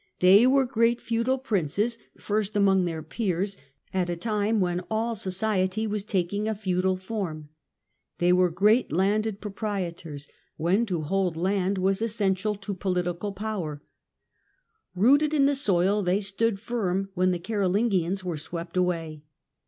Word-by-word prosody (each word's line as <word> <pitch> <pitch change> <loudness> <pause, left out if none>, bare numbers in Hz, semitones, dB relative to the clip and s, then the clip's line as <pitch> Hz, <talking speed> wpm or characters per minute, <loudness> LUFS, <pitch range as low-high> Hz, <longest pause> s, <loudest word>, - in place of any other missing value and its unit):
They 195 +6 +6
were 270 0 +4
great 235 -1 +2
feudal 235 +3 0
princes, 215 - -1
" - - -46
first 210 0 -2
among 195 -2 +4
their 160 -2 -4
peers/' 195 +2 -2 0.4
at 185 -2 0
a 175 - -1
time 210 +3 0
when 175 -2 0
all 225 +2 0
society 195 0 -1
was 210 -2 -2
taking 200 +1 -1
a 220 - -1
feudal 185 -2 0
form; 185 -7 -5 0.7
they 175 +1 +3
were 180 0 +4
great 210 +8 +3
landed 205 +4 +1
proprietors, 180 -8 -5 0.3
when 190 +8 +1
to 175 -5 -1
hold 180 +1 0
land 190 +2 0
was 190 +2 +1
essential 210 -2 0
to 200 0 -6
political 180 0 -2
power; 190 -8 -4 0.6
" 445 - -46
rooted 285 +10 +4
in 280 -2 +4
the 285 - +3
soil,", 200 -6 +2
they 185 +1 +1
stood 205 +1 0
firm 195 -4 -2
when 185 -1 +2
the 180 - 0
Caro 200 +1 -1
lingians 190 -2 +1
were 175 -3 -3
swept 170 +4 -6
away. 165 -4 -1
195 Hz, 155 wpm, -26 LUFS, 180-215 Hz, 0.7 s, They